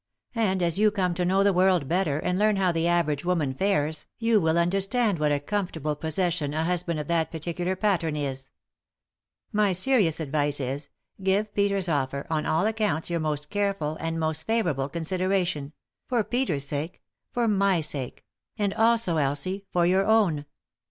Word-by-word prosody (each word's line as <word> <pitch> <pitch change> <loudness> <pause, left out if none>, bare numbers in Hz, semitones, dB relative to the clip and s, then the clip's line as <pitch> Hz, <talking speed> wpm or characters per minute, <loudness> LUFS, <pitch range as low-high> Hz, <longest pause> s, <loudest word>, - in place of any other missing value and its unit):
And 190 -6 +1
as 170 +2 +1
you 215 0 +5
come 190 -4 0
to 180 +1 -2
know 190 +2 +3
the 200 -1 +3
world 180 -5 +3
better, 170 -3 +1
and 180 +4 -1
learn 215 0 +3
how 190 -2 +2
the 165 0 0
average 170 -4 +1
woman 165 -7 0
fares, 155 -3 -1
you 230 -3 +2
will 160 0 +2
understand 195 +3 +1
what 150 -1 +2
a 145 - +1
comfortable 160 -3 -2
possession 160 -1 -1
a 160 - 0
husband 170 -1 -1
of 150 - -4
that 165 -2 0
particular 175 +3 -3
pattern 185 -6 0
is. 135 -2 -4 1.0
My 205 -2 +2
serious 185 - +2
advice 145 -1 0
is 135 +2 -4 0.2
— - - -23
give 200 +3 0
Peter's 200 -2 +1
offer, 140 -3 -1
on 155 -1 0
all 160 +5 +2
accounts, 210 -8 -1
your 170 - 0
most 150 -1 -3
careful, 200 -7 -1
and 165 0 -3
most 160 0 -2
favourable, 165 -12 0
consideration 175 -2 -1 0.2
— - - -61
for 240 -3 +2
Peter's 205 - -1
sake, 150 +5 -4 0.3
for 240 -1 0
my 200 -3 +2
sake; 145 -5 -5 0.3
and 200 -2 0
also, 225 -6 +4
Elsie, 155 +8 -1
for 175 -1 +2
your 190 +3 +2
own. 195 -10 +3
175 Hz, 175 wpm, -26 LUFS, 155-195 Hz, 1.0 s, you